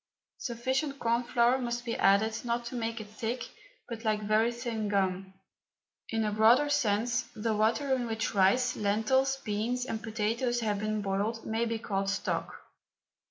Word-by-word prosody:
Sufficient 260 +4 -2
corn 235 -1 +1
flour 245 +1 +3
must 240 -1 -3
be 230 - -2
added 215 +3 +3
not 235 0 -1
to 235 - -6
make 230 -1 -2
it 215 - -6
thick 225 +4 -4 0.4
but 230 -1 -7
like 215 -1 0
very 215 +3 +3
thin 235 -3 -3
gum. 190 -1 -1 0.7
In 225 -1 0
a 210 - 0
broader 230 +7 +5
sense, 235 -4 +1
the 220 0 -1
water 225 +6 +2
in 250 -2 0
which 225 0 -2
rice, 205 +6 +3
lentils, 225 +6 +1
beans 240 +1 -2
and 225 -3 -4
potatoes 230 +2 -1
have 210 -3 0
been 215 0 -2
boiled 200 +4 -2
may 225 +1 0
be 230 0 -1
called 195 -3 -2
stock. 200 - -2
225 Hz, 160 wpm, -30 LUFS, 215-240 Hz, 0.7 s, broader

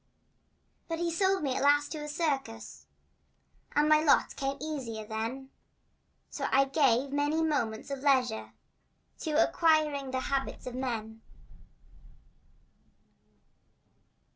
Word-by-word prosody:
But 330 - -3
he 340 0 -1
sold 380 +1 +1
me 265 -3 0
at - - -1
last 290 +1 +3
to 310 - -4
a 300 - -6
circus 270 - -3 0.9
And 295 +1 +4
my 305 0 +5
lot 295 - +4
became 275 0 -3
easier 250 -8 -5
then, 230 +5 -5 0.8
So - - -3
I 275 +1 +5
gave 270 -2 +2
many 295 +3 +1
moments 280 -5 -1
of 275 - -3
leisure 260 -5 +1 0.7
To 315 - -3
acquiring 310 -3 +2
the 260 0 -2
habits 270 0 -3
of 250 - -5
men. 225 -4 -4
275 Hz, 115 wpm, -30 LUFS, 250-305 Hz, 0.9 s, my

